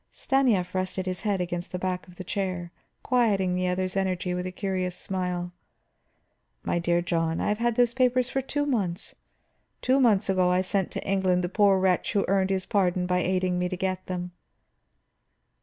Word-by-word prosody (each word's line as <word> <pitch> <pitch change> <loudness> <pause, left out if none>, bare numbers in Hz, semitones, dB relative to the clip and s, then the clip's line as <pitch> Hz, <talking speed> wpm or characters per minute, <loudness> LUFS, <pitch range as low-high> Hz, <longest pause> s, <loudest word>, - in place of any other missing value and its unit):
Stanief 245 -10 +1
rested 185 0 -2
his 185 -1 -2
head 205 -3 0
against 175 0 -3
the 180 - -3
back 180 0 -3
of 180 - -15
the 185 - -7
chair, 185 -2 -3 0.3
quieting 205 -7 +2
the 180 0 0
other's 185 +1 -1
energy 185 -2 -1
with 180 0 -2
a - - -5
curious 185 -1 -2
smile. 180 -2 -3 1.1
"My 175 - 0
dear 175 0 +1
John, 165 -2 0
I - - 0
have 210 +1 0
had 240 -1 +1
those 240 -1 +3
papers 255 -1 +2
for 270 +1 -1
two 290 +2 -2
months; 200 -11 -1 0.7
two 260 +2 +2
months 220 -6 +4
ago 185 -2 +2
I 180 +1 +3
sent 190 0 0
to - - -5
England 190 -2 +2
the 175 - -1
poor 200 0 +4
wretch 185 +1 +1
who 200 - +2
earned 190 0 +2
his 190 -1 0
pardon 185 -4 +1
by 180 0 +1
aiding 180 0 0
me 180 0 0
to 185 - -4
get 185 0 -2
them." 180 -1 -4
185 Hz, 190 wpm, -26 LUFS, 180-200 Hz, 1.1 s, months